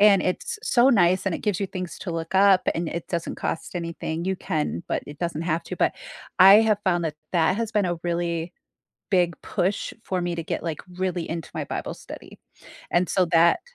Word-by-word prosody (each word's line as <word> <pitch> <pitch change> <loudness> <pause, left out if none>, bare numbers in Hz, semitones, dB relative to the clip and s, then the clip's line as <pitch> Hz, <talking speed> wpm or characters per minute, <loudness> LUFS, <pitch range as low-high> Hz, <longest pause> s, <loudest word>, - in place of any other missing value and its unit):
and 200 -2 +6
it's 430 - -2
so 245 +1 +4
nice 185 -5 +3
and 185 - +1
it - - -4
gives 205 -2 0
you 195 - 0
things 185 -2 -6
to 180 - -5
look 165 +1 -4
up 195 -1 +5
and 165 -1 -2
it 170 0 -5
doesn't 170 -2 -3
cost 165 - -4
anything, 170 -1 -4
you 190 - 0
can, 155 -2 -2
but - - -1
it 145 -1 -10
doesn't 170 -2 -2
have 165 0 -1
to, - - -6
but, - - +2 0.5
I 190 +2 +10
have 215 -2 +2
found 175 -2 +1
that 150 -2 -3 0.2
that 170 0 +3
has 230 -1 -2
been 210 -2 +1
a 175 -2 -1
really 170 0 -2 0.6
big 175 -3 +2
push 190 +3 -1
for 185 -1 -1
me 175 0 -2
to 165 - -3
get, - - -3
like, 165 -2 -3 0.2
really 180 -3 -1
into 165 -2 -4
my - - -2
Bible - - -4
study, - - -11 0.5
and 175 +1 +2
so 185 -2 +3
that 170 +1 +5
175 Hz, 215 wpm, -24 LUFS, 170-190 Hz, 0.6 s, I